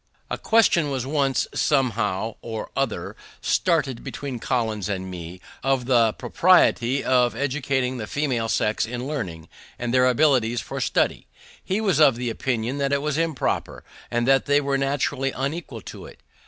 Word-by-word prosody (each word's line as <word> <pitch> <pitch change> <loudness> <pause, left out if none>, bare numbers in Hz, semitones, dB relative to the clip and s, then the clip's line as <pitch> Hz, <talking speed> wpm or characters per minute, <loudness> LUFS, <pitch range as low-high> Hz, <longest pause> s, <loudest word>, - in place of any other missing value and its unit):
A - - -1
question 205 -9 +3
was 130 -3 -2
once, 140 -1 +1
somehow 115 -7 0
or 110 -2 -6
other, - - -2 0.2
started 150 -9 0
between 135 -4 -5
Collins 110 -5 -1
and 95 -2 -3
me, 90 0 -8 0.2
of 135 -2 +1
the 120 -4 +3
propriety 140 -7 +3
of 125 -2 +2
educating 130 -1 -1
the 105 -3 -5
female 130 -6 -1
sex 105 +2 +1
in 120 +2 -5
learning, 95 - -5 0.3
and 120 0 -3
their 125 0 +5
abilities 125 -3 +3
for - - -5
study. - - 0 0.4
He 190 +3 -1
was 195 -9 +1
of 140 -6 +6
opinion 120 +1 -2
that 140 0 0
it 140 0 +1
was 150 -1 -1
improper, 165 -5 -2 0.3
and 120 +1 0
that 135 0 +3
they 145 0 +4
were 140 -1 -1
naturally 135 -1 0
unequal 135 -3 -4
to - - -10
it. - - -15
130 Hz, 155 wpm, -24 LUFS, 115-140 Hz, 0.4 s, of